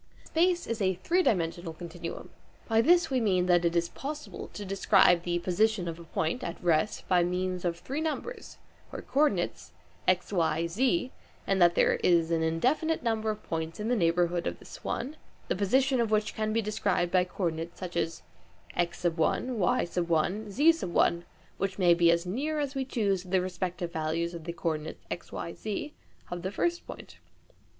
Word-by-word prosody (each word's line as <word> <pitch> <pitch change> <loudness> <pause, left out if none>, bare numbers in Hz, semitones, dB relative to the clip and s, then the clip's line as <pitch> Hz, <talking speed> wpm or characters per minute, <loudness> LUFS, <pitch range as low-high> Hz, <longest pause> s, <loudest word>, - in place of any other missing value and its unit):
Space 345 +2 +2
is 230 -1 -3
a 190 -1 +2
three 335 - +1
dimensional 170 - 0
continuum. 170 0 -7 0.4
By 225 -1 +4
this 345 +3 +4
we 260 -2 +2
mean 185 -5 +2
that 175 -1 +4
it 170 0 +1
is 170 0 +1
possible 295 - -6
to 205 - -6
describe 190 -2 +4
the 175 0 -1
position 185 +2 +1
of 165 0 -5
a - - -9
point 160 +8 -2
(at 170 - -4
rest) 170 +4 +1
by 180 -2 +4
means 180 +1 -1
of 170 -1 -1
three 275 - -4
numbers 320 - -4 0.3
(co - - -6
ordinales) 270 -12 0 0.4
x, 185 +2 +2
y, 165 -2 +1
z, 255 - +1 0.3
and 195 -1 +1
that 175 0 +6
there - - +3
is 170 -2 +3
an 165 -1 +2
indefinite 255 - +1
number 220 -2 0
of 215 0 -4
points 165 +1 -4
in 215 +2 -2
the 245 - +3
neighbourhood 175 -2 +1
of - - -3
this - - -12
one, 280 +6 -3 0.3
the - - +1
position 255 +6 +2
of 230 - 0
which 215 -1 +1
can 215 0 -1
be 225 +1 +1
described 200 -4 0
by 185 -1 +4
co 185 +2 -6
ordinates 165 0 -2
such 180 -2 -6
as 165 -1 -2 0.5
x, 175 0 -1
y, 180 +6 +1
z, 190 - +2 0.9
which 195 0 -1
may 180 -3 +5
be 170 0 +4
as 170 +1 +2
near 280 +12 -2
as 285 -2 -2
we 270 -1 -1
choose 200 -7 0
to 185 - -14
the 185 +1 +2
respective 180 -1 -3
values 165 +2 -1
of 165 -2 -8
the 170 - -4
co 170 - -1
ordinates 155 0 -5
x, - - -5
y, 170 - -5
z, 220 +8 -5 0.4
of 175 0 -4
the 190 +2 -3
first 345 - -1
point. - - -10
185 Hz, 185 wpm, -29 LUFS, 170-225 Hz, 0.9 s, that